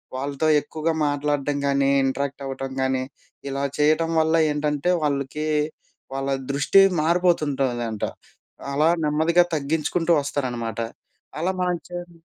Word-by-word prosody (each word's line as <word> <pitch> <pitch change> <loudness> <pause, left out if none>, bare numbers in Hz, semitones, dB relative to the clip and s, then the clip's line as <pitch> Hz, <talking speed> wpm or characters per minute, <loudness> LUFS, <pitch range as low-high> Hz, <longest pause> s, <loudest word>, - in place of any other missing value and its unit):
వాళ్ళతో 140 +3 -1
ఎక్కువగా 160 +2 -2
మాట్లాడటం 145 0 -1
కానీ, 140 0 +2
ఇంటరాక్ట్ 140 +1 -2
అవ్వటం 135 0 -5
కానీ, 130 0 +1 0.5
ఇలా 140 0 -2
చేయటం 155 +2 +3
వల్ల 160 +1 +3 0.2
ఏంటంటే 150 +2 -1
వాళ్ళకీ 140 +1 -1 0.7
వాళ్ళ 135 0 -2 0.2
దృష్టి 145 +8 +5 0.2
మారిపోతుంటదంట. 140 - +1 0.7
అలా 150 +3 +3
నెమ్మదిగా 160 +4 +3
తగ్గించుకుంటూ 160 +3 0
వస్తారనమాట. 120 -6 -3 0.6
అలా 175 +4 +1
మనం 180 -1 +1
చేయము. 175 -1 -8
145 Hz, 105 wpm, -23 LUFS, 135-160 Hz, 0.7 s, దృష్టి